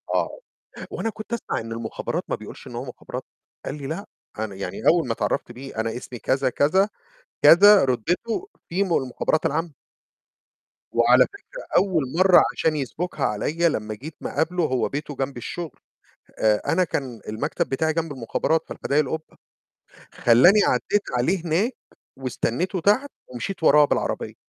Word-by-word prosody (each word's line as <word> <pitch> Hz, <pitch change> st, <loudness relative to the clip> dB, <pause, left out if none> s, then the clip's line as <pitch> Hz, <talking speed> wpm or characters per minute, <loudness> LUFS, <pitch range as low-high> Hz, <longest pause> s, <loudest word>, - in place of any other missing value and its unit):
آه، -, -, -1 dB, 0.5 s
وأنا 225 Hz, -, -2 dB
كنت 215 Hz, +2 st, -10 dB
أسمع 235 Hz, -, -2 dB
إن 115 Hz, 0 st, -7 dB
المُخابرات 115 Hz, -1 st, -4 dB
ما -, -, -1 dB
بيقولش -, -, -11 dB
إن -, -, -9 dB
هو -, -, -4 dB
مُخابرات، -, -, -7 dB, 0.4 s
قال -, -, -4 dB
لي: 140 Hz, -, -6 dB
"لأ." 165 Hz, +7 st, -4 dB, 0.3 s
أنا 110 Hz, -3 st, -3 dB
يعني 95 Hz, -, -6 dB
أول 165 Hz, -4 st, +4 dB
ما 115 Hz, -, 0 dB
تعرفت 110 Hz, +2 st, -2 dB
بيه، 130 Hz, 0 st, -10 dB
"أنا 115 Hz, +1 st, -2 dB
اسمي 125 Hz, -1 st, -7 dB
كذا، 130 Hz, +1 st, +1 dB
كذا، 190 Hz, -, +3 dB, 0.5 s
كذا." 200 Hz, +1 st, +8 dB
رُتبتُه 180 Hz, -, -1 dB, 0.2 s
في 185 Hz, +4 st, 0 dB
من 180 Hz, -, -2 dB
المُخابرات 130 Hz, +4 st, 0 dB
العامة. 160 Hz, +1 st, -2 dB, 1.2 s
وعلى -, -, +6 dB
فكرة -, -, -11 dB
أول 180 Hz, -7 st, +3 dB
مَرّة 185 Hz, -1 st, +7 dB
عشان 155 Hz, -1 st, 0 dB
يسبُكها 150 Hz, +6 st, -3 dB
عليّا 160 Hz, +11 st, +1 dB
لما 110 Hz, -7 st, -3 dB
جيت 150 Hz, +8 st, -9 dB
ما -, -, -4 dB
اقابلُه، 165 Hz, +3 st, 0 dB
هو 130 Hz, -4 st, 0 dB
بيته 145 Hz, 0 st, -5 dB
جمب 135 Hz, -1 st, -3 dB
الشُغل، 165 Hz, +7 st, -6 dB, 0.6 s
آآ، 105 Hz, -1 st, +3 dB
أنا 185 Hz, +2 st, +3 dB
كان 130 Hz, -8 st, -4 dB
المكتب 145 Hz, +10 st, -2 dB
بتاعي 160 Hz, +4 st, 0 dB
جمب 165 Hz, -2 st, -2 dB
المخابرات 140 Hz, +6 st, 0 dB
في -, -, -5 dB
حدايق 145 Hz, +2 st, +3 dB
القُبة، 160 Hz, +4 st, -6 dB, 0.8 s
خلّاني 130 Hz, -, +6 dB
عديت 205 Hz, 0 st, +1 dB, 0.2 s
عليه 170 Hz, +8 st, 0 dB
هناك 195 Hz, +11 st, +1 dB, 0.4 s
واستنيتُه 135 Hz, -, -2 dB
تحت 230 Hz, -, +2 dB, 0.2 s
ومشيت 125 Hz, +9 st, -5 dB
وراه 150 Hz, -1 st, +7 dB
بالعربية. -, -, -1 dB
155 Hz, 155 wpm, -24 LUFS, 125-180 Hz, 1.2 s, كذا